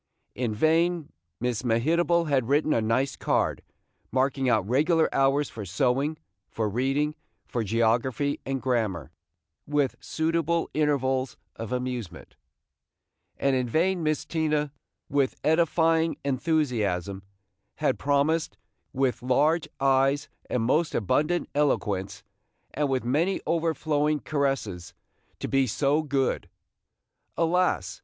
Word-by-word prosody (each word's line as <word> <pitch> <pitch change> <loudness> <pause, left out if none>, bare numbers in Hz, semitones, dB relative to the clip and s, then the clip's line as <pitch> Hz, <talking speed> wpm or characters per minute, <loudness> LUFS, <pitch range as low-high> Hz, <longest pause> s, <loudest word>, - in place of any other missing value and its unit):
In 120 -4 -2
vain 165 +4 +2 0.3
Miss 125 -2 -1
Mehitable 165 +9 +2
had 135 -5 +1
written 150 +2 +3
a 115 - +2
nice 120 +5 0
card, - - 0 0.5
marking 130 0 +1
out 100 - +2
regular 160 +7 +3
hours 135 +1 +2
for 110 - -8
sewing, 130 - 0 0.3
for 110 -1 -2
reading, 135 +7 0 0.3
for 120 - -2
geography 115 +6 +1
and 135 -1 -3
grammar, 110 - -1 0.6
with 145 -3 +1
suitable 165 +1 -1
intervals 135 -3 0 0.2
of 115 +1 -6
amusement; 125 -6 -4 1.0
and 140 -1 +1
in 125 -2 -1
vain 175 +7 +1
Miss 155 -1 0
Tina, 150 -3 0 0.4
with 140 -2 +1
edifying 165 0 +2
enthusiasm, 120 - 0 0.5
had - - 0
promised, 145 +3 +1 0.4
with 130 -1 0
large 150 +6 +2
eyes 135 +1 +2 0.2
and 125 - 0
most 150 +7 +1
abundant 150 - +1
eloquence, 105 -10 0 0.5
and 145 0 0
with 130 -1 0
many 155 +10 +1
overflowing 155 -2 0
caresses, 115 - -2 0.4
to - - -4
be 135 -1 +2
"so 140 +6 +1
good." 140 -3 -1 0.9
Alas! 180 +2 +1
140 Hz, 115 wpm, -26 LUFS, 125-155 Hz, 1.0 s, written